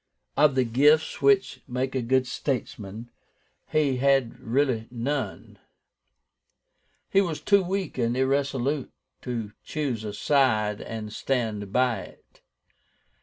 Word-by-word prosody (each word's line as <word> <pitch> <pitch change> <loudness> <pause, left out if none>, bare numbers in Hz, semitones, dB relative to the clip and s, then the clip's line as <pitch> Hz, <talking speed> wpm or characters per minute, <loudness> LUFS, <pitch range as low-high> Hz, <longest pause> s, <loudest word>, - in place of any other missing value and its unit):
Of 145 -1 +4
the 130 - +3
gifts 145 +8 +3
which 135 -1 +3
make 130 +1 -2
a 130 - 0
good 130 +2 +2
statesman, 120 -4 -4 0.6
he 145 -4 +2
had 135 -2 +2
really 120 -2 0
none. 130 +4 -4 1.5
He 195 - +5
was 165 -6 -2
too 200 +6 +4
weak 190 -5 -3
and 120 +1 +1
irresolute 135 +1 0 0.3
to 115 -4 -4
choose 135 -8 -3
a 105 -1 -5
side 110 -4 +2
and 110 -1 -6
stand 110 -6 -2
by 125 -2 +2
it. - - -14
130 Hz, 120 wpm, -26 LUFS, 115-140 Hz, 1.5 s, He